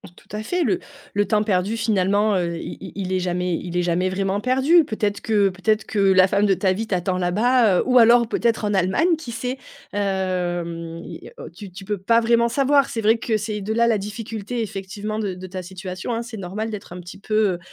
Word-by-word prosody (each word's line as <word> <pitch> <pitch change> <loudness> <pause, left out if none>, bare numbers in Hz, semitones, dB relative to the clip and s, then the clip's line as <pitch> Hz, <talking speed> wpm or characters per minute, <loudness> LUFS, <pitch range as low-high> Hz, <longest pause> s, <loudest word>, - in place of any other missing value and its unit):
Tout - - -20
à 215 +1 -4
fait, 355 +9 -1
le 360 - +1 0.4
le 205 0 +2
temps 215 -2 +2
perdu 200 +1 0
finalement, 205 -2 +2
heu, 170 -2 -1
i - - -6
i 190 - -8
i - - -17
il 185 -1 -4
est 185 - +1
jamais 180 -1 -1
il 175 +1 -6
est 180 - +3
jamais 175 +2 0
vraiment 195 +1 -1
perdu. 265 +8 +4
Peut-être 210 -3 -2
que 205 -3 +2
peut-être 215 +4 0
que 215 - -5
la 190 -1 +5
femme 200 +2 +2
de 195 - +4
ta 190 0 +1
vie 220 +4 -2
t'attend 185 -2 -1
là-bas, 210 +3 +3
heu, - - +1
ou 250 0 +4
alors 235 0 +6
peut-être 230 0 0
en 205 -1 0
Allemagne, 195 - +2
qui 280 -7 -8
sait, 250 +3 -4 0.4
hem, 175 -4 -2
il 165 - -9
y - - -10
a, - - -19
heu, - - -8
tu 185 +3 -11
tu 190 +2 -10
peux 205 +1 -2
pas 230 +5 +3
vraiment 235 0 +3
savoir. 275 +3 +2
C'est 225 - -2
vrai 220 +2 +4
que 225 -1 -1
c'est 210 0 -4
de 215 +3 -2
là, 235 +1 +3
la 225 -2 +3
difficulté 220 +2 -5
effectivement 205 +1 -5
de 205 -4 -2
de 185 +1 -8
ta 185 0 -6
situation, 185 +4 -6
hein. 230 - -2
C'est 235 -2 -8
normal 200 +4 -4
d'être 200 -4 -7
un 180 - -8
petit 175 0 -11
peu, 215 - -6 0.2
heu, - - -10
205 Hz, 240 wpm, -22 LUFS, 185-225 Hz, 0.4 s, alors